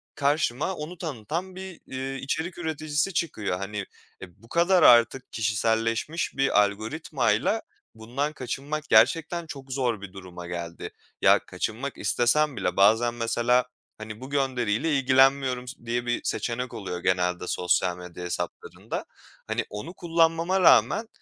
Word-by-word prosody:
karşıma 145 +3 +1
onu 165 +3 -7
tanıtan 165 - -4
bir, 190 -2 -9
iii, 135 +1 -5
içerik 160 +6 -3
üreticisi 155 +1 -1
çıkıyor. 110 - -1
Hani, 100 +1 -4 0.4
e, 95 +3 -12
bu 115 - -17
kadar 175 +1 +3
artık 120 +2 +5
kişiselleşmiş 115 +8 0
bir 135 -6 +4
algoritmayla 115 - 0 0.3
bundan 125 +7 -3
kaçınmak 150 +4 -5
gerçekten 165 +9 +4
çok 135 -4 -9
zor 125 -5 -1
bir 100 -2 -9
duruma 90 -2 -9
geldi. 85 -1 -6 0.3
Ya, - - +6
kaçınmak 130 +6 -4
istesem 140 +3 +2
bile 100 - -1
bazen 110 +4 +4
mesela, 120 +1 +1 0.3
hani, 110 +1 -8
"Bu 130 - -8
gönderiyle 130 0 0
ilgilenmiyorum." 130 -1 +3
s 125 -2 -10
diye 120 +1 -1
bir 120 -1 -1
seçenek 125 +1 -2
oluyor 90 -3 -5
genelde 90 0 0
sosyal 90 0 +1
medya 90 0 -9
hesaplarında. 90 - -5 0.4
Hani, - - -1
onu 105 - -7
kullanmama 165 +2 +1
rağmen 130 - +5
125 Hz, 135 wpm, -26 LUFS, 110-155 Hz, 0.4 s, Ya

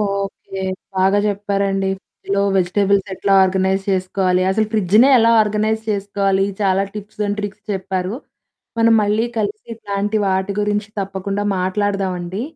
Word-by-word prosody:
Okay. 200 -1 -3 0.4
బాగా 190 +2 +3
జెప్పారండి. 200 -1 -1
ఫ్రిడ్జు‌లో 200 +1 -3
vegetables 195 +2 +1
ఎట్లా 195 +1 0
ఆర్గనైజ్ 190 +1 +1
చేసుకోవాలి? 185 -1 +1
అసలు 215 +3 +1
ఫ్రిడ్జునే 215 +4 +4
ఎలా 230 0 +4
ఆర్గనైజ్ 215 +1 0
చేసుకోవాలి? 195 -1 0 0.2
చాలా 195 -1 +2
టిప్స్ 210 0 -9
అండ్ 205 +1 -2
ట్రిక్స్ 205 0 -6
చెప్పారు. 190 0 -3 0.6
మనం 230 0 +5
మళ్ళీ 210 +3 +1
కలిసి 210 0 -3
ఇట్లాంటి 205 0 -2
వాటి 190 +1 0
గురించి 210 0 -1
తప్పకుండా 195 +1 -3
మాట్లాడుదామండి. 190 0 -2
200 Hz, 125 wpm, -19 LUFS, 190-205 Hz, 0.6 s, మనం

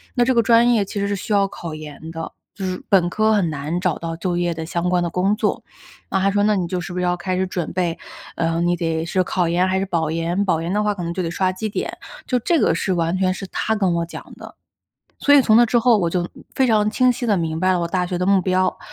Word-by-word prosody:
那 245 - +3
这 260 - +2
个 235 - +5
专 235 +1 +5
业 205 -3 +2
其 200 - -5
实 200 - 0
是 200 - -1
需 210 +2 -4
要 200 -1 +3
考 170 -4 -7
研 155 +1 -9
的， 165 0 -6 0.2
就 195 - -5
是 185 -1 -3
本 180 -3 +4
科 215 +3 +2
很 195 -6 +2
难 150 +3 -3
找 180 -3 0
到 165 -1 -5
就 175 +1 -2
业 175 -1 0
的 160 0 -5
相 175 +1 -2
关 180 -1 +2
的 170 - -1
工 190 +4 +1
作。 - - -1 0.5
那 190 - +1
她 195 - +3
说 205 0 +1
那 210 0 +3
你 185 -3 0
就 180 0 -2
是 175 - -7
不 180 - -5
是 180 - -1
要 180 0 +1
开 185 +1 -2
始 190 - +1
准 175 -2 -4
备， 175 -2 -1 0.4
呃， 165 0 0
你 175 0 +2
得 165 -2 -2
是 185 +2 0
考 175 -1 0
研 180 +2 +2
还 185 - 0
是 195 - -1
保 165 -4 -1
研， 165 +4 -1
保 165 -4 +1
研 170 +2 -3
的 210 - +1
话 210 0 +1
可 180 -3 -6
能 170 0 -3
就 185 - -2
得 165 - -2
刷 185 +1 0
绩 200 +4 -4
点， - - -4 0.3
就 250 - +1
这 330 +8 +1
个 - - +3
是 190 - -1
完 170 0 0
全 185 -1 +1
是 195 - -7
她 220 +4 -1
跟 190 -4 +1
我 170 - -1
讲 170 - -9
的。 - - -11 0.6
所 285 - +4
以 285 - +8
从 220 -4 +4
那 240 - +7
之 235 +1 +2
后， 235 0 +4
我 170 -3 0
就 175 -1 -1 0.3
非 265 - +3
常 215 -2 +2
清 255 +3 +3
晰 245 - -3
地 210 - +2
明 160 -1 -2
白 185 +2 +2
了 180 - 0
我 170 - -2
大 180 0 0
学 180 -1 -3
的 180 - -1
目 195 -1 +4
标， 185 0 +1
185 Hz, 310 characters per minute, -21 LUFS, 170-205 Hz, 0.6 s, 以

